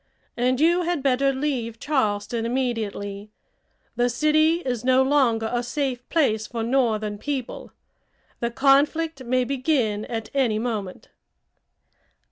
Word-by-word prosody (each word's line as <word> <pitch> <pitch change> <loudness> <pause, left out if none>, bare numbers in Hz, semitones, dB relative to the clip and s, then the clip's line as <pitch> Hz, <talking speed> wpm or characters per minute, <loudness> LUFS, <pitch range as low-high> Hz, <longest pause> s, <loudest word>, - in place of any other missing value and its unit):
And 250 +1 +1
you 340 +3 +4
had 345 -5 -1
better 275 0 +2
leave 260 -5 -2
Charleston 225 -5 -1
immediately. 220 -5 -3 0.7
The 245 0 +2
city 310 +6 +2
is 245 -3 -2
no 260 +1 +4
longer 255 -5 +2
a 240 - +1
safe 250 0 -3
place 220 -10 +1
for 230 -2 -4
northern 220 -4 0
people. 270 -1 -5 0.7
The 235 - -1
conflict 280 +4 +2
may 255 +1 +1
begin 250 -5 0
at 225 -2 -5
any 255 -6 +1
moment." 215 -5 -4
250 Hz, 120 wpm, -24 LUFS, 225-275 Hz, 0.7 s, you